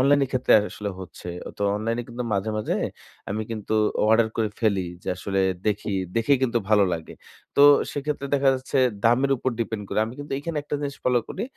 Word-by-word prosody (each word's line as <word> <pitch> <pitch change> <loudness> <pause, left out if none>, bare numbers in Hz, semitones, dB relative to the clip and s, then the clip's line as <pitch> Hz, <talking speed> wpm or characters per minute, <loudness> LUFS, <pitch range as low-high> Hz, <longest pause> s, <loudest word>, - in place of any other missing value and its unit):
Online 140 +2 +5
এর - - -6
ক্ষেত্রে 130 -1 +2 0.2
আসলে 105 -1 -5
হচ্ছে। 90 -1 -9 0.3
তো 105 - -2
অনলাইন 115 +2 -1
এ - - -4
কিন্তু 120 +1 -5
মাঝে, 100 +2 0
মাঝে 105 - -1 0.6
আমি 110 +2 -1
কিন্তু 110 -1 -4 0.4
অর্ডার 110 0 +4
করে 110 -2 +1
ফেলি 105 -4 +2 0.2
যে - - -5
আসলে 95 +1 -1 0.3
দেখি। 105 0 -1 0.2
দেখেই 120 +4 +3
কিন্তু 120 -2 +1
ভালো 105 -2 +6
লাগে। 80 -1 -5 0.4
তো 140 - +6 0.3
সেক্ষেত্রে 145 0 -3
দেখা 140 -1 +3
যাচ্ছে 130 +1 -2 0.3
দামের 130 +4 +4
উপর 130 - -1
ডিপেন্ড 110 -2 -2
করে। - - -1
আমি 115 - -7
কিন্তু 145 -1 -7
এখানে 155 +2 -5
একটা 145 - -5
জিনিস 140 -1 -4
ফলো 125 -1 +4
করি 195 - -4
115 Hz, 195 wpm, -24 LUFS, 105-135 Hz, 0.6 s, ভালো